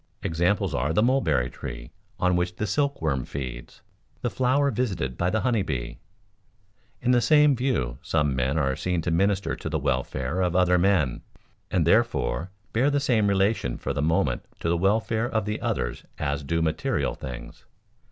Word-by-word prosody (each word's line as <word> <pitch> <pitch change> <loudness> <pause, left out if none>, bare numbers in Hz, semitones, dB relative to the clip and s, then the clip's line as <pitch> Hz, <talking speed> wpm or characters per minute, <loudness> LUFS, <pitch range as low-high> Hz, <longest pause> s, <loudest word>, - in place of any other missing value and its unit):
Examples 85 +2 +1
are 70 +2 0
the 105 - +3
mulberry 100 - +2
tree - - -8 0.3
on 90 0 +2
which 90 0 -1
the 105 - -2
silkworm 90 - 0
feeds, 65 -3 -7 0.4
the 120 - 0
flower 130 +6 +2
visited 95 - -2
by 90 +6 0
the 110 +2 0
honey 120 -4 +1
bee. 70 -10 -4 1.0
In 125 - +3
the 120 -1 +4
same 150 0 +5
view 115 - -1
some 75 -4 0
men 65 +4 0
are 65 -4 +1
seen 90 0 -1
to 85 - -1
minister 100 +3 +1
to - - -5
the - - 0
welfare 65 +8 -1
of 90 -1 0
other 90 -1 +4
men 90 -9 +2 0.5
and - - +1
therefore 80 +8 +2 0.2
bear 125 +6 +3
the 145 0 +1
same 120 -7 +2
relation 100 - +1
for - - -3
the - - -1
moment 75 -5 +1 0.2
to 85 - -1
the 85 - +2
welfare 110 +5 +1
of 110 -5 -1
the 105 +1 -3
others - - -2
as 70 +1 -2
do 80 +4 0
material 80 -1 0
things. 65 -2 -9
90 Hz, 170 wpm, -26 LUFS, 70-110 Hz, 1.0 s, same